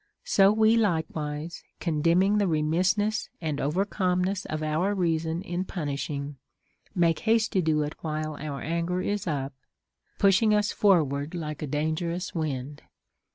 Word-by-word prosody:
So 195 +1 +4
Λνο 220 +1 +4
like 170 -7 +2
wise, 150 +2 -5 0.2
condemning 170 +5 +2
the 200 - +2
remissness 185 +7 +1
and 155 -4 -2
over 160 +8 +1
calmness 185 -1 0
of 155 0 -3
our 165 +7 0
reason 165 -1 0
in 180 -2 -2
punishing, 145 -4 -4 0.6
make 170 -3 +2
haste 225 0 +2
to 190 - +2
do 155 -2 +1
it 150 +1 -4
while 155 -1 -3
our 145 -2 -5
anger 170 +3 -1
is 205 0 -2
up, 140 -4 -2 0.6
pushing 205 +2 +4
us 210 0 +1
forward 155 -6 +2
like 155 -3 -5
a 155 - -3
dangerous 160 +5 -2
wind. 145 -3 -3
165 Hz, 145 wpm, -27 LUFS, 150-190 Hz, 0.6 s, So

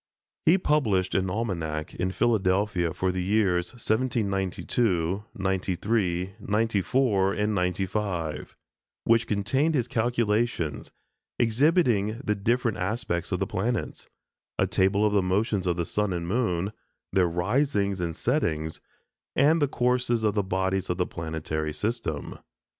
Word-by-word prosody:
He 170 +4 +7
published 115 - +1
an 95 -1 +1
almanac 85 -7 -3
in 90 - -1
Philadelphia 95 -4 +1
for 90 +2 -1
the 90 0 -2
years 95 -3 +2
1792, 105 -5 0
'93, 95 0 -1
'94, 105 -1 +1
and 105 +1 0
'95, 90 -3 -2 0.5
which 115 0 +3
contained 130 +10 +1
his 125 -4 +1
calculations, 115 - 0 0.5
exhibiting 120 - +2
the 105 - +1
different 115 +3 0
aspects 90 -3 -2
of - - 0
the - - +1
planets, 115 +5 -3 0.5
a - - +3
table 100 +2 +2
of 105 - +2
the 100 - +4
motions 95 +1 0
of 85 -1 +1
the 85 - -1
sun 105 0 -1
and 85 -1 -3
moon, 100 -3 0 0.4
their 95 -2 +4
risings 100 - 0
and 85 -2 -2
settings, 80 - -1 0.5
and 150 +4 +4
the 145 - +4
courses 125 -3 +1
of 105 -1 +2
the 105 - +2
bodies 95 0 -1
of 90 - 0
the 90 - +1
planetary 80 -1 -3
system. 100 -4 -3
100 Hz, 130 wpm, -26 LUFS, 90-115 Hz, 0.5 s, He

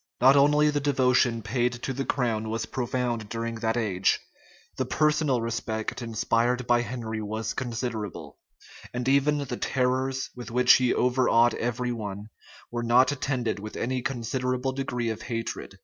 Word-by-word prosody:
Not 130 +3 +6
only 150 +2 +5
the 145 - 0
devotion 125 -4 +2
paid 120 +3 0
to 125 +2 -4
the 135 +2 -2
crown 115 -5 -1
was 110 -1 -2
profound 120 -2 -2
during 115 0 -3
that 110 +1 0
age: 95 -5 +1 0.6
the - - +1
personal 150 -4 +2
respect 115 0 -3
inspired 120 +2 0
by 120 0 +3
Henry 115 -3 -4
was 110 +2 -3
considerable; 115 -4 -4 0.6
and 125 +1 -2
even 140 +2 +3
the 135 -4 -4
terrors 130 0 0
with 120 -3 -8
which 125 +2 +5
he 125 -1 +2
overawed 125 -2 +3
every 120 +1 -2
one, 105 -2 -5 0.4
were 120 0 -2
not 120 +4 +4
attended 130 -6 -2
with 105 +1 -7
any 130 +2 -1
considerable 125 0 -2
degree 125 -3 -2
of 110 - -6
hatred. 115 -4 -5
120 Hz, 150 wpm, -27 LUFS, 115-130 Hz, 0.6 s, Not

